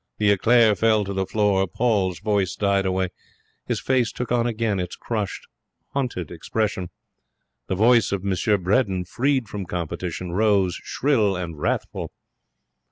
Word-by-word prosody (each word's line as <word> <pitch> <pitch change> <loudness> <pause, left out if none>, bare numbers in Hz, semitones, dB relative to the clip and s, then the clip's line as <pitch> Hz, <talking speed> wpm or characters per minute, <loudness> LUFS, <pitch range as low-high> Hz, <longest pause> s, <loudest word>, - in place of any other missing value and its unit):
The 105 -1 +3
eclair 110 +2 +5
fell 110 0 +2
to 100 - -4
the 95 -1 -1
floor. 100 -3 +2
Paul's 95 -2 0
voice 100 -4 0
died 100 -1 +1
away. 95 0 0 0.6
His - - -1
face 125 -3 +1
took 125 -1 -5
on 120 -1 +2
again 110 -3 -1
its 90 -1 -4
crushed, 105 -5 -4 0.5
hunted 125 - -2
expression. 95 +1 -2 0.8
The - - -1
voice 115 +2 +4
of 100 -1 -2
M. 100 - +1 0.3
Bredin, 95 -1 +1
freed 130 +5 0
from 100 -3 -6
competition, 90 +1 -4
rose 100 -2 +2
shrill 110 -9 +1
and 85 -4 -5
wrathful. - - -2
100 Hz, 145 wpm, -23 LUFS, 95-115 Hz, 0.8 s, eclair